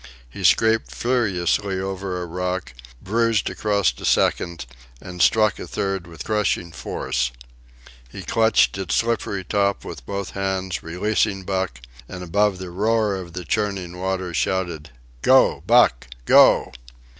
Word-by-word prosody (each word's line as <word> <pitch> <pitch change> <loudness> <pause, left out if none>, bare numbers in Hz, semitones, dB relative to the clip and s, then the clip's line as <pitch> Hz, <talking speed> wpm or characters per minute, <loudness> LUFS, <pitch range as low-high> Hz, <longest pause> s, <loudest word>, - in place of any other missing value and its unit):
He - - -9
scraped 110 0 +3
furiously 100 -5 0
over 95 -1 -4
a 90 - -4
rock, 90 -3 -4 0.3
bruised 115 +1 +1
across 100 -9 +1
a - - -10
second, 85 -5 +1 0.3
and 90 -1 -7
struck 110 -2 +3
a - - -7
third 95 -3 -3
with 85 -2 -9
crushing 105 -5 -1
force. 65 -5 -2 0.8
He - - -9
clutched 110 -3 +2
its 95 -3 -1
slippery 115 -4 -1
top 100 0 0
with - - -8
both 100 -1 -4
hands, 95 -2 -2
releasing 95 +3 -1
Buck, 95 -7 -3 0.3
and 90 -1 -7
above 100 +3 +1
the 90 -1 -7
roar 105 +2 +1
of 90 -3 -7
the 90 0 -6
churning 95 -2 -2
water 95 -1 -3
shouted: 85 -1 -2 0.3
"Go, - - +4
Buck! 60 - +4 0.2
Go!" - - +6
95 Hz, 135 wpm, -22 LUFS, 90-105 Hz, 0.8 s, Go